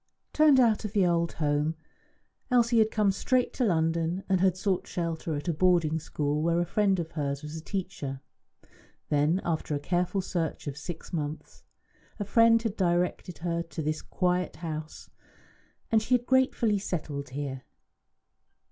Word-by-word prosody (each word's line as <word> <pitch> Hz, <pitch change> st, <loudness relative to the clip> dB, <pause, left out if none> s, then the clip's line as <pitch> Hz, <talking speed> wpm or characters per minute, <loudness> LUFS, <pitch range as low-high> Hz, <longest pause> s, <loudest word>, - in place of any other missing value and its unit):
Turned 300 Hz, -3 st, +6 dB
out 230 Hz, -4 st, +3 dB
of 210 Hz, -1 st, -5 dB
the 200 Hz, -4 st, +3 dB
old 170 Hz, -1 st, +1 dB
home, 150 Hz, +1 st, 0 dB, 0.7 s
Elsie 240 Hz, -2 st, +4 dB
had 220 Hz, 0 st, +4 dB
come 210 Hz, -3 st, +2 dB
straight 250 Hz, +6 st, 0 dB
to 255 Hz, -, -1 dB
London, 165 Hz, 0 st, 0 dB
and 190 Hz, -2 st, +2 dB
had 185 Hz, -1 st, +3 dB
sought 190 Hz, -1 st, -1 dB
shelter 165 Hz, -2 st, -3 dB
at 145 Hz, +4 st, -5 dB
a 170 Hz, -, +1 dB
boarding 165 Hz, -2 st, +2 dB
school 150 Hz, -1 st, -2 dB
where 170 Hz, +1 st, +2 dB
a 175 Hz, -, +1 dB
friend 195 Hz, +1 st, +2 dB
of 165 Hz, -1 st, -4 dB
hers 140 Hz, -2 st, -3 dB
was 150 Hz, +1 st, -7 dB
a 160 Hz, -, -6 dB
teacher. 170 Hz, -8 st, -4 dB, 0.9 s
Then, 150 Hz, +5 st, +2 dB
after 160 Hz, -3 st, -1 dB
a -, -, -1 dB
careful 180 Hz, +5 st, 0 dB
search 170 Hz, -3 st, -3 dB
of 145 Hz, -2 st, -4 dB
six 165 Hz, +4 st, -8 dB
months, 150 Hz, -1 st, -5 dB, 0.6 s
a 205 Hz, -, -2 dB
friend 230 Hz, +2 st, +5 dB
had 220 Hz, -3 st, -2 dB
directed 180 Hz, -1 st, 0 dB
her 170 Hz, -1 st, 0 dB
to 160 Hz, -2 st, -6 dB
this 155 Hz, +1 st, -2 dB
quiet 180 Hz, -2 st, -1 dB
house, 155 Hz, -1 st, -7 dB, 0.8 s
and 220 Hz, -1 st, +4 dB
she 245 Hz, +3 st, +2 dB
had 245 Hz, -1 st, -1 dB
gratefully 250 Hz, -5 st, +2 dB
settled 150 Hz, -7 st, -4 dB
here. 135 Hz, -1 st, -5 dB
175 Hz, 165 wpm, -28 LUFS, 155-200 Hz, 0.9 s, Turned